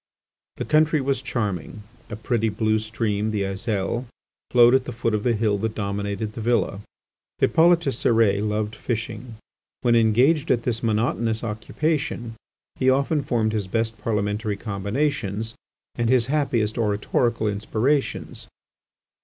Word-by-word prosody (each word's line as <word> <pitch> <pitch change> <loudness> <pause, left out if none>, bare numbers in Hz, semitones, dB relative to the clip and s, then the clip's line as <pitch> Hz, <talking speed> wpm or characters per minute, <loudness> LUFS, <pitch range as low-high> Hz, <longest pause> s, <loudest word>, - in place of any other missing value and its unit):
The - - -3
country 155 0 +3
was 135 -2 0
charming; 105 - -3 0.3
a 105 - -5
pretty 110 0 0
blue 110 0 +1
stream, 110 -1 -2
the 105 -2 -1
Aiselle, 100 +4 -2 0.4
flowed 120 0 +6
at 130 -1 +3
the - - -5
foot 115 -1 -1
of 105 - +1
the 120 +1 +1
hill 105 -2 +1
that 110 +1 -2
dominated 100 +1 -3
the 115 - -6
villa. 115 -3 +1 0.6
Hippolyte 170 +1 +4
Cérès 115 -7 +2
loved 105 +1 -2
fishing; 115 0 -4 0.5
when 120 -1 +3
engaged 125 +8 +3
at 120 -3 +2
this 115 -1 -1
monotonous 115 0 0
occupation 120 +2 -2 0.4
he 130 - +3
often 140 +3 +2
formed 110 -4 0
his 105 -3 -2
best 115 +2 -1
Parliamentary 105 -1 -1
combinations, 110 +1 -2 0.4
and 120 -1 -1
his 125 -2 +4
happiest 120 -8 0
oratorical 110 +2 0
inspirations. 110 +7 -1
115 Hz, 135 wpm, -24 LUFS, 105-125 Hz, 0.6 s, flowed